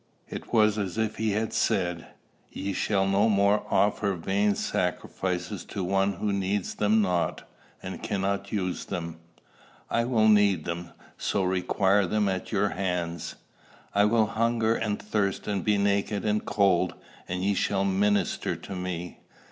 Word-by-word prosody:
It - - -7
was 110 -2 +4
as 100 -1 -3
if 110 -1 -1
he 110 -1 0
had 110 +2 -1
said, 85 -1 0 0.4
"Ye 100 +1 -3
shall 95 +1 +1
no 100 +3 +3
more 100 0 +3
offer 100 -1 +2
vain 100 +4 +1
sacrifices 90 0 -2
to 100 - -4
one 95 +2 +1
who 100 +2 -2
needs 100 0 -1
them 105 +1 +3
not, 90 -3 -1 0.4
and - - -6
cannot 100 0 -2
use 95 -4 -2
them. 85 -1 -5 0.7
I 115 0 +2
will 115 -3 +3
need 100 -6 +4
them, 85 +1 -4 0.3
so 100 - 0
require 95 +1 +2
them 105 +2 +1
at 95 -1 -2
your 105 -1 +2
hands. 90 -3 -3 0.6
I 100 +1 +4
will 110 +1 +3
hunger 115 +1 +1
and 105 -2 -1
thirst 105 -2 -1
and 100 -3 -1
be 105 -1 +2
naked 100 +1 0
and 105 0 +1
cold, 95 -3 +2 0.3
and 90 +1 -3
ye 100 +1 +2
shall 100 0 0
minister 100 +1 +1
to 100 - -8
me. 90 -1 -5
100 Hz, 155 wpm, -27 LUFS, 95-105 Hz, 0.7 s, was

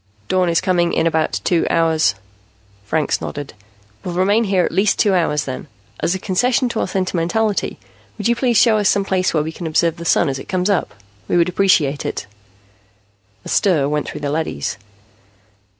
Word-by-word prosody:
"Dawn 185 -1 +2
is 165 - +2
coming 175 -2 +1
in 160 - +1
about 160 -11 0
two 175 -2 +1
hours." 160 -7 +2 0.7
Franks 155 +7 0
nodded. 145 -1 -6 0.5
"We'll 175 - -5
remain 200 +3 +2
at 180 - +2
least 195 +4 +2
two 205 - +3
hours, 155 -5 +1
then. 130 -1 -6 0.3
As 175 - 0
a - - -4
concession 245 +7 +1
to 230 - -3
our - - 0
sentimentality, 190 +3 -1 0.4
would 210 - -1
you 235 - +2
please 240 -2 +1
show 220 -3 +5
us 205 - +2
some 200 -1 +1
place 185 -1 +1
where 155 -2 +1
we 160 - -4
can 165 +1 -6
observe 165 +1 +1
the 170 - -7
Sun 170 - +3
as 135 -1 -2
it - - -11
comes 185 +1 0
up? 195 - -1 0.3
We - - +1
would 170 +1 +3
appreciate 165 -7 +2
it." - - -4 1.2
A - - -7
stir 165 -9 +2
went 150 0 -2
through 150 - -7
the 145 -1 -2
leadys. 105 - -3
175 Hz, 185 wpm, -19 LUFS, 155-195 Hz, 1.2 s, show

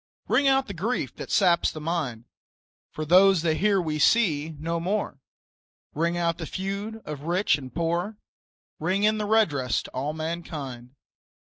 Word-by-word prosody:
Ring 280 - +3
out 270 0 +3
the 200 - -7
grief 210 +9 -2
that - - -7
saps 175 -4 +3
the 155 - -8
mind, 150 -8 -3 0.6
For 155 - -5
those 185 +1 +5
that 160 -2 +1
here 200 +1 +3
we 155 -3 -2
see 160 -6 +2
no 165 +3 -2
more, 185 -4 -2 0.7
Ring 170 +3 0
out 170 -1 0
the 165 - -5
feud 200 +4 -5
of 150 -1 -7
rich 180 0 +2
and 130 -3 -8
poor, 170 +6 -2 0.6
Ring 185 +6 0
in 215 0 +3
redress 205 - +1
to - - -11
all 140 +4 -3
mankind. 150 -6 -6
170 Hz, 155 wpm, -26 LUFS, 155-200 Hz, 0.7 s, those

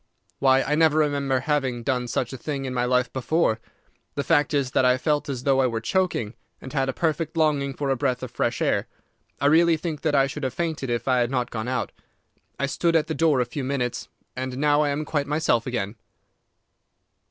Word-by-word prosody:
'Why, 135 -1 +4
I 150 - -1
never 155 0 +4
remember 140 -3 +1
having 130 -4 -1
done 125 -1 -1
such 120 +1 -2
a - - -5
thing 140 0 -4
in 130 - -3
my 125 -1 0
life 125 0 +1
before. 130 -3 +1 0.6
The 140 - -1
fact 145 -2 +2
is 140 -4 0
that - - +2
I 125 0 +4
felt 150 +2 0
as 130 -3 -4
though 135 -1 +3
I 130 - +3
were 115 -2 -2
choking, 120 - -1 0.3
and 130 - -10
had 135 -2 +1
a - - -1
perfect 160 +1 -1
longing 145 -4 +1
for 140 -2 -1
a - - +2
breath 130 -1 -1
of 125 - -6
fresh - - -1
air. - - +1 0.5
I - - -1
really 165 +2 +5
think 155 -2 -4
that 155 -2 +1
I 135 -1 +5
should 150 +2 -6
have 130 -2 -2
fainted 160 -6 -2
if 120 +1 -2
I 130 -1 +3
had 120 -1 +1
not 125 -2 -1
gone 110 0 -4
out. 130 0 -2 0.7
I 140 - +1
stood 165 +4 0
at 160 - +3
the 160 - -3
door 160 -3 +3
for - - +3
a - - +1
few 125 +3 -5
minutes, 130 -2 -2 0.3
and 130 0 -4
now 145 +1 +3
I 150 - +1
am 145 +2 -2
quite 145 -1 -1
myself 145 -6 +1
again. 110 -3 -3
135 Hz, 225 wpm, -24 LUFS, 125-150 Hz, 0.7 s, really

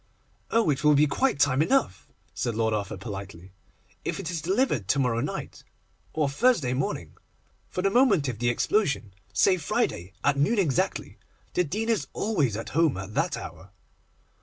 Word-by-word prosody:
'Oh, 225 -8 +3
it 140 - -2
will 150 -1 +6
be 145 +2 +5
quite 150 - 0
time 145 -1 +3
enough!' 270 - +1 0.3
said 120 -3 -2
Lord 110 0 +1
Arthur 105 0 -3
politely, 95 -2 -8 0.5
'if - - -3
it 170 - -4
is 165 -3 -3
delivered 180 - 0
to 115 - +2
morrow 125 -4 +1
night - - -5 0.5
or 155 -2 0
Thursday 145 - +2
morning. 130 +1 -3 0.5
For 180 - -3
the 195 - +2
moment 205 - +4
of 120 -4 -4
the 120 0 +1
explosion, 140 - 0 0.2
say 190 -1 +3
Friday 95 - -2
at 145 -1 +2
noon 215 +11 +2
exactly. 160 -10 0 0.3
The 180 - +2
Dean 215 +9 -3
is 230 -2 0
always 150 - 0
at 115 - -6
home 160 - +2
at 95 +2 -7
that - - 0
hour. 95 - -9
145 Hz, 170 wpm, -26 LUFS, 115-190 Hz, 0.5 s, will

